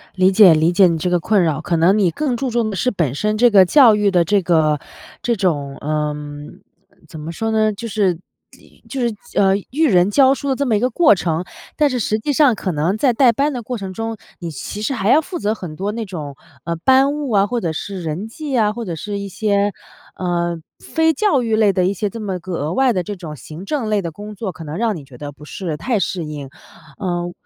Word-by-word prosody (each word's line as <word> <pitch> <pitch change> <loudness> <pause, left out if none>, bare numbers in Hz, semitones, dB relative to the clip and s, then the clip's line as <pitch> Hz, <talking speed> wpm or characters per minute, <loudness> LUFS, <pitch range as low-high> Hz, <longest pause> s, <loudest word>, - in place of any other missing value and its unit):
理 185 0 +4
解 190 -3 +7
理 160 +2 +3
解 185 +1 +5
你 165 - 0
这 180 +3 -1
个 175 0 +2
困 195 +2 +2
扰。 155 -1 0
可 175 -2 -1
能 175 +5 +4
你 190 -5 +2
更 270 - -1
注 265 0 -2
重 235 -2 0
的 205 - -4
是 250 +7 0
本 165 - -1
身 210 +6 -1
这 240 +1 +5
个 195 -3 +6
教 240 +1 +6
育 205 -1 +2
的 175 -2 +3
这 200 +4 +2
个 160 -4 +2 0.4
这 235 -1 0
种 145 -8 -1
嗯， 150 -1 -4 0.5
怎 160 - -10
么 155 +2 -6
说 225 +6 -3
呢？ 215 -1 +2
就 230 +3 -7
是 195 -6 0 0.4
以 - - -23
就 270 - -4
是， 235 -2 0 0.2
呃， 195 -1 +4 0.2
育 310 +4 +2
人 180 -3 +4
教 265 +5 +5
书 280 0 -4
的 265 - +1
这 280 - -1
么 235 -5 +2
一 205 - +2
个 250 - +1
过 305 +1 +5
程。 170 -1 -2 0.3
但 300 -2 +3
是 255 -2 -2
实 215 0 0
际 290 +6 -1
上 275 -5 +4
可 190 - -3
能 165 +6 0
在 250 +2 +2
带 245 0 +5
班 280 +5 0
的 245 - -4
过 245 +2 -5
程 195 -3 -6
中， 225 +1 -4 0.2
你 170 -2 -5
其 205 +8 -6
实 270 - -1
还 195 -3 -1
要 300 +6 +6
负 350 +3 -6
责 210 -4 0
很 175 -8 -8
多 195 +5 -3
那 230 +1 -4
种， 150 -7 -7 0.3
呃， 170 - -2
班 265 - +4
务 290 -4 -4
啊， 200 -1 +4
或 240 +1 -2
者 170 - -1
是 195 +3 -5
人 165 +6 -4
际 280 +2 -4
啊， 210 -2 +2
或 235 -1 -6
者 170 - -4
是 205 +5 -5
一 200 - -5
些， 205 0 0 0.4
呃， 175 -2 -2 0.2
非 320 0 +1
教 295 - +2
育 225 -1 +1
类 215 -2 +4
的 180 -1 +1
一 195 - +1
些 210 0 -2
这 230 - -8
么 195 -4 -3
个 185 +1 -7
额 155 +3 -2
外 265 -1 +3
的 185 -5 -1
这 205 +4 -5
种 160 -5 -8
行 155 +6 -10
政 270 -3 -2
类 210 -1 +1
的 170 -3 -5
工 210 +5 -9
作， 200 -2 -4
可 170 - -11
能 155 +1 -6
让 225 -1 0
你 155 - -8
觉 130 -3 -14
得 145 -1 -6
不 150 +1 -15
是 165 -1 -5
太 230 - -1
适 180 -3 -2
应。 145 -3 -7 0.5
呃， 175 -3 -3
200 Hz, 270 characters per minute, -19 LUFS, 170-230 Hz, 0.5 s, 解